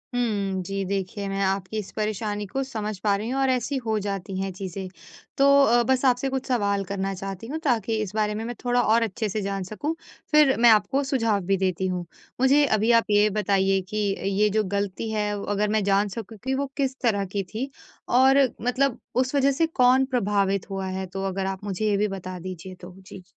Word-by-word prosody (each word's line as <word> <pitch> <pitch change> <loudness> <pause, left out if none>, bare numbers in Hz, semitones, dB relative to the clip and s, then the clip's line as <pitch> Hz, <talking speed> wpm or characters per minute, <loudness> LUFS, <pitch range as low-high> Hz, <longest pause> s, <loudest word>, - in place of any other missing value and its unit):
हुँ। 200 -6 0
जी, 195 +1 -3
देखिए 195 +1 -3
मैं 195 0 -2
आपकी 195 +2 -2
इस 200 - -7
परेशानी 210 -1 -2
को 270 +8 -3
समझ 215 -6 -4
पा 205 -2 +2
रही 215 +4 -4
हूँ 270 +1 -1
और 265 - +2
ऐसी 260 +2 0
हो 220 -1 +1
जाती 195 -1 -4
हैं 195 0 -2
चीज़ें। 190 0 -6 0.5
तो 275 - +4 0.2
अ, 240 -1 +4
बस 260 +2 +1
आपसे 255 +1 +2
कुछ 265 0 -3
सवाल 200 -5 +1
करना 195 0 -3
चाहती 195 +3 -6
हूँ 315 +4 -4
ताकि 230 -5 +1
इस 210 -1 -4
बारे 210 -1 +1
में 220 - -4
मैं 240 0 -5
थोड़ा 245 0 +2
और 230 +2 +3
अच्छे 215 0 -2
से 215 +2 -2
जान 195 -1 -3
सकूँ 290 - -4 0.4
फिर 300 -3 +5
मैं 240 0 +7
आपको 265 +6 +3
सुझाव 230 -6 +1
भी 195 0 +2
देती 185 0 0
हूँ। 180 -1 -3 0.4
मुझे 285 +2 +5
अभी 220 -1 +2
आप 230 -1 +5
ये 210 +1 +4
बताइए 195 -2 +1
कि 215 - -4 0.4
ये 210 0 +4
जो 215 +1 +1
गलती 200 +2 -2
है 210 -1 0 0.2
अगर 205 +1 +1
मैं 210 - +1
जान 200 +1 +2
सकूँ 220 -1 -7
कि 265 - -1
वो 280 +1 -1
किस 270 -2 0
तरह 205 -5 +1
की 200 - 0
थी 255 +5 -3 0.5
और 265 +1 +6 0.2
मतलब 250 +1 0 0.2
उस 255 +2 0
वज़ह 275 0 +4
से 325 +5 +1
कौन 260 -3 +4
प्रभावित 200 -6 0
हुआ 195 -1 -3
है? 190 0 -3
तो 195 +1 -6
अगर 190 0 -2
आप 195 +1 -4
मुझे 205 +1 -3
ये 200 - +2
भी 210 +1 +2
बता 185 -2 -6
दीजिए 185 +1 -8
तो। 180 0 -12
जी। 190 -1 -12
210 Hz, 215 wpm, -25 LUFS, 195-245 Hz, 0.5 s, मैं